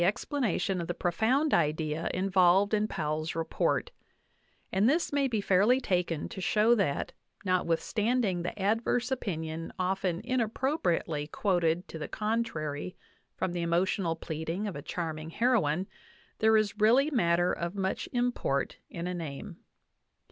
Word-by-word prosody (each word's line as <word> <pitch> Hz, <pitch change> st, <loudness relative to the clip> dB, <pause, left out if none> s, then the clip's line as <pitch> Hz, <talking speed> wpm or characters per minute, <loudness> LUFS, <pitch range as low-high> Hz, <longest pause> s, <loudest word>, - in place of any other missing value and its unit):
VIII 175 Hz, +3 st, +5 dB
planation 205 Hz, -9 st, -1 dB
of 170 Hz, -, -5 dB
the 175 Hz, -, -3 dB
profound 225 Hz, -, +1 dB
idea 155 Hz, 0 st, +1 dB
involved 190 Hz, +1 st, +3 dB
in 215 Hz, 0 st, +2 dB
Powell's 155 Hz, -3 st, -2 dB
report; 165 Hz, -, 0 dB, 0.8 s
and 200 Hz, +5 st, +3 dB
this 315 Hz, +1 st, +1 dB
may 280 Hz, -1 st, +2 dB
be 225 Hz, -5 st, -1 dB
fairly 200 Hz, +7 st, +4 dB
taken 180 Hz, -, -1 dB
to 190 Hz, -, -7 dB
show 215 Hz, +5 st, +4 dB
that, 195 Hz, -11 st, 0 dB, 0.3 s
notwithstanding 185 Hz, +3 st, +1 dB
the 175 Hz, +4 st, -5 dB
adverse 225 Hz, +5 st, +1 dB
opinion 165 Hz, -9 st, -3 dB
often 185 Hz, -1 st, 0 dB
inappropriately 225 Hz, -, 0 dB
quoted 175 Hz, -1 st, 0 dB
to> 160 Hz, -, -8 dB
the 150 Hz, -, -4 dB
contrary 185 Hz, -7 st, -2 dB, 0.4 s
from 185 Hz, -, -1 dB
the 175 Hz, -, -2 dB
emotional 170 Hz, +1 st, +1 dB
pleading 160 Hz, +5 st, -4 dB
of 200 Hz, -, -4 dB
a 145 Hz, -, -5 dB
charming 160 Hz, -1 st, -4 dB
heroine, 190 Hz, -6 st, +1 dB, 0.5 s
there 220 Hz, 0 st, +5 dB
is 210 Hz, -1 st, 0 dB
really 250 Hz, +8 st, +4 dB
matter 175 Hz, -, +2 dB
of 170 Hz, +2 st, -4 dB
much 190 Hz, -1 st, -2 dB
import 245 Hz, -, 0 dB
in 170 Hz, 0 st, -5 dB
a 180 Hz, -, -2 dB
name. 155 Hz, -6 st, -6 dB
185 Hz, 140 wpm, -29 LUFS, 165-220 Hz, 0.8 s, VIII